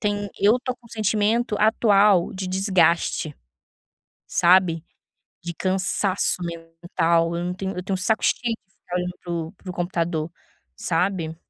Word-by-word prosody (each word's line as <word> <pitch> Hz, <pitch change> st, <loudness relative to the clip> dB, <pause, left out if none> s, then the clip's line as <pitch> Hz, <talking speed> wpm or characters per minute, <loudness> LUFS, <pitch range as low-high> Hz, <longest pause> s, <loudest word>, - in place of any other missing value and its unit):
tem 205 Hz, -1 st, -1 dB
eu 210 Hz, +4 st, +5 dB
tô 255 Hz, 0 st, -2 dB
com 235 Hz, -, -21 dB
sentimento 215 Hz, +1 st, 0 dB
atual 210 Hz, -3 st, +4 dB
de 185 Hz, 0 st, -4 dB
desgaste, 175 Hz, -5 st, +1 dB, 0.9 s
sabe, 175 Hz, -2 st, +3 dB, 0.6 s
de 170 Hz, -, -4 dB
cansaço 185 Hz, +1 st, 0 dB
mental, 165 Hz, 0 st, -1 dB
eu 170 Hz, -, -3 dB
não 180 Hz, -, -2 dB
tenho 190 Hz, 0 st, -5 dB
eu 180 Hz, -, -3 dB
tenho 190 Hz, +1 st, -2 dB
saco 220 Hz, +5 st, 0 dB
cheio 235 Hz, -2 st, +1 dB
de 195 Hz, -3 st, -41 dB
ficar 180 Hz, -1 st, -6 dB
olhando 180 Hz, 0 st, -2 dB
para 175 Hz, -, -8 dB
o 165 Hz, -1 st, -3 dB
para 185 Hz, -2 st, -10 dB
o -, -, -7 dB
computador, 170 Hz, -2 st, -2 dB, 0.5 s
sabe. 165 Hz, -2 st, -1 dB
185 Hz, 145 wpm, -23 LUFS, 170-205 Hz, 0.9 s, eu